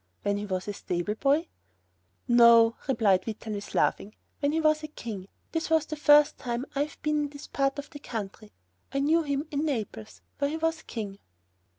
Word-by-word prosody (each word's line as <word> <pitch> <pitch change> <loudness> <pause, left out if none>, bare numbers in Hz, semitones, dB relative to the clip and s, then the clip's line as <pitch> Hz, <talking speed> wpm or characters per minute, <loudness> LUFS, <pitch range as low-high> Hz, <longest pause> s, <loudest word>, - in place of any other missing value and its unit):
"When 205 0 +1
he 205 0 -4
was 185 0 -3
a 205 - -2
stable 180 +1 -2
boy?" 285 +8 +1 0.8
"No," 235 -1 +7
replied 210 -8 +3
Vitalis, 215 -1 -6
laughing, 210 - +1 0.2
"when 285 -1 +1
he 320 - +1
was 310 -1 +3
a 305 - -5
king. 215 -10 -7 0.2
This 325 0 -2
is 320 -1 +3
the 310 - -5
first 295 0 +5
time 240 0 -3
I 285 +1 +1
have 300 - -14
been 300 0 +1
in - - -6
this 285 0 -10
part 275 0 0
of 285 +2 -7
the 290 - -9
country. 215 -4 -6 0.4
I - - -2
knew 305 +4 +3
him 285 0 -2
in 290 0 -1
Naples, 190 - -4 0.2
where 280 - +1
he 315 - -3
was 325 0 -1
king." 200 -4 -6
275 Hz, 195 wpm, -28 LUFS, 210-300 Hz, 0.8 s, No